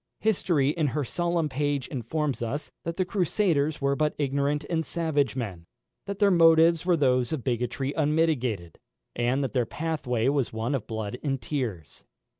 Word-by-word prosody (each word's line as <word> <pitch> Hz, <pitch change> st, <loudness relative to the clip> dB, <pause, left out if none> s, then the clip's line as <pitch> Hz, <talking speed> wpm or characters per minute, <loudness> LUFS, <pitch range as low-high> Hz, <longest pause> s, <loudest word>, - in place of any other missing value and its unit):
History 175 Hz, -10 st, +2 dB
in 155 Hz, -2 st, 0 dB
her 150 Hz, +2 st, -1 dB
solemn 170 Hz, +4 st, 0 dB
page 145 Hz, -1 st, -1 dB
informs 140 Hz, +3 st, -2 dB
us, 130 Hz, +6 st, -3 dB
that 170 Hz, 0 st, -3 dB
the 185 Hz, -, +1 dB
Crusaders 170 Hz, -5 st, +1 dB
were 140 Hz, 0 st, +2 dB
but 150 Hz, +1 st, 0 dB
ignorant 140 Hz, +1 st, 0 dB
and 160 Hz, -1 st, 0 dB
savage 155 Hz, -6 st, 0 dB
men, 95 Hz, -10 st, -5 dB, 0.4 s
that 200 Hz, 0 st, -4 dB
their 205 Hz, -1 st, +4 dB
motives 165 Hz, 0 st, +5 dB
were 175 Hz, -2 st, +4 dB
those 125 Hz, -4 st, +2 dB
of 155 Hz, -6 st, -2 dB
bigotry 125 Hz, +2 st, -1 dB
unmitigated, 145 Hz, -, 0 dB, 0.4 s
and 125 Hz, +4 st, +1 dB
that 135 Hz, -, -3 dB
their 125 Hz, -4 st, +1 dB
pathway 140 Hz, -8 st, -1 dB
was 140 Hz, -2 st, +1 dB
one 110 Hz, +4 st, -2 dB
of 125 Hz, -6 st, -2 dB
blood 110 Hz, +1 st, -4 dB
and 135 Hz, -3 st, -1 dB
tears. 115 Hz, -, -4 dB
145 Hz, 165 wpm, -27 LUFS, 125-160 Hz, 0.4 s, motives